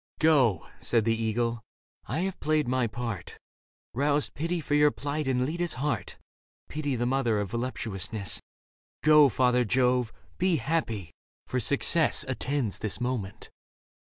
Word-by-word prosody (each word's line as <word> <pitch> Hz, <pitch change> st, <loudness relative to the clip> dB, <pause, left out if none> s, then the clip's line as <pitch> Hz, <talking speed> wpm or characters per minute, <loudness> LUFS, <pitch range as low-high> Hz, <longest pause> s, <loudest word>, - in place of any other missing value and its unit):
" -, -, -36 dB
Go," 135 Hz, -, +4 dB
said 115 Hz, -3 st, +1 dB
the 115 Hz, -1 st, +2 dB
eagle, 115 Hz, +1 st, -1 dB, 0.2 s
" -, -, -36 dB
I 160 Hz, -, -1 dB
have 190 Hz, 0 st, -3 dB
played 155 Hz, -2 st, +1 dB
my 125 Hz, -1 st, +1 dB
part, 115 Hz, -5 st, -5 dB, 0.6 s
Roused 145 Hz, +3 st, +1 dB
pity 170 Hz, +4 st, -2 dB
for 150 Hz, -, -3 dB
your 150 Hz, 0 st, +6 dB
plight 145 Hz, 0 st, -3 dB
in 125 Hz, -1 st, +1 dB
Leda's 170 Hz, +3 st, -2 dB
heart 135 Hz, -3 st, -2 dB, 0.5 s
(Pity 145 Hz, -3 st, -2 dB
the 120 Hz, 0 st, -1 dB
mother 120 Hz, -4 st, +1 dB
of 100 Hz, -2 st, -3 dB
voluptuousness). 110 Hz, -4 st, -3 dB, 0.6 s
Go, 150 Hz, -2 st, +7 dB
father 125 Hz, 0 st, +3 dB
Jove; 125 Hz, 0 st, +2 dB, 0.3 s
be 185 Hz, -2 st, +3 dB
happy; 115 Hz, -, -2 dB, 0.3 s
for -, -, -1 dB
success -, -, +3 dB
Attends 135 Hz, -7 st, -2 dB
this 110 Hz, +1 st, -1 dB
moment." 120 Hz, -6 st, -4 dB
125 Hz, 145 wpm, -28 LUFS, 115-150 Hz, 0.6 s, Go